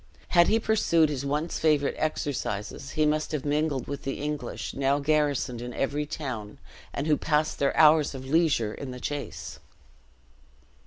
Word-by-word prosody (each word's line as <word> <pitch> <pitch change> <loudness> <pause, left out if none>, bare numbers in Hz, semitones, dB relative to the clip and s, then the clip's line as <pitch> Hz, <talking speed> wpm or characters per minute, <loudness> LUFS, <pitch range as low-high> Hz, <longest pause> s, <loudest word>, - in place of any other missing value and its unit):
Had 175 -1 +5
he 225 - +3
pursued 170 -8 +3
his 140 -3 -3
once 150 +4 -1
favorite 150 -3 +2
exercises, 135 -5 -3
he 155 -1 +2
must 155 0 0
have 150 -2 -2
mingled 145 -3 0
with 140 -1 -5
the 135 - -4
English, 150 0 -4
now 140 +1 +1
garrisoned 145 -4 0
in 120 0 -6
every 145 +2 -1
town, 125 -9 -5 0.3
and 140 - -3
who 155 -1 +4
passed 155 0 0
their 140 - +1
hours 155 -2 +5
of 130 0 -7
leisure 140 -7 +2
in 140 - -7
the 125 0 -7
chase. 145 +2 -5
145 Hz, 160 wpm, -27 LUFS, 135-155 Hz, 0.3 s, Had